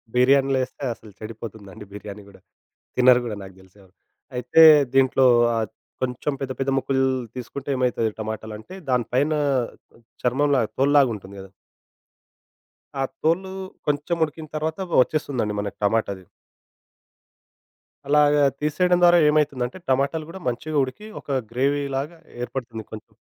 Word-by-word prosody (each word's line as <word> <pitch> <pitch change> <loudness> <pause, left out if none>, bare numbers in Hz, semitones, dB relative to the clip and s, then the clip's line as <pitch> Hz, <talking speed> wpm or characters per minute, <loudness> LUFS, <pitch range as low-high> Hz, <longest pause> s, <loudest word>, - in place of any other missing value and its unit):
బిర్యానీలో 135 +1 +4
ఏస్తే 135 +2 -9
అసలు 110 -1 -16
చెడిపోతుందండి. 110 -3 -9
బిర్యానీ 105 0 -9
గూడా. 100 - -17 0.6
తినరు 125 0 +6
గూడా 110 -3 -4
నాకు 95 -1 -11
దెలిసెవరు. 95 0 -21 0.4
అయితే 125 +6 +4 0.3
దీంట్లో 135 0 +4 0.3
ఆహ్, 110 -1 0 0.4
కొంచెం 130 +3 -2
పెద్ద, 135 -1 -3
పెద్ద 135 0 0
ముక్కలు 135 0 0 0.3
తీసుకుంటేమైతది 125 -2 -1
టమాటాలంటే, 110 - -6 0.2
దాని 125 -2 +2
పైన 145 +4 +2 0.9
చర్మంలాగా 130 -1 +2
తోల్లాగా 140 -1 +4
ఉంటుంది 100 0 -12
గదా! 95 0 -12 1.5
ఆ - - +1 0.2
తోలు 185 +4 +1 0.3
కొంచెం 150 +4 0
ఉడికిన 155 +1 -7
తర్వాత 155 +2 -2 0.2
ఒచ్చేస్తుందండి 125 -8 -2
మనకి 100 -1 -6
టమాటాది. 100 -3 0 1.8
అలాగా 150 0 +4 0.2
తీసేయడం 175 +4 +2
ద్వారా 175 0 +7
ఏమైతుందంటే, 145 -1 0
టమాటాలు 140 +4 0
గూడా 190 +3 -9
మంచిగా 155 +6 -3
ఉడికి, 130 +12 -9
ఒక - - -29 0.2
గ్రేవీలాగా 140 +4 -1 0.2
ఏర్పడుతుంది 120 -3 -5
కొంచెం 110 - -10
130 Hz, 115 wpm, -23 LUFS, 110-145 Hz, 1.8 s, ద్వారా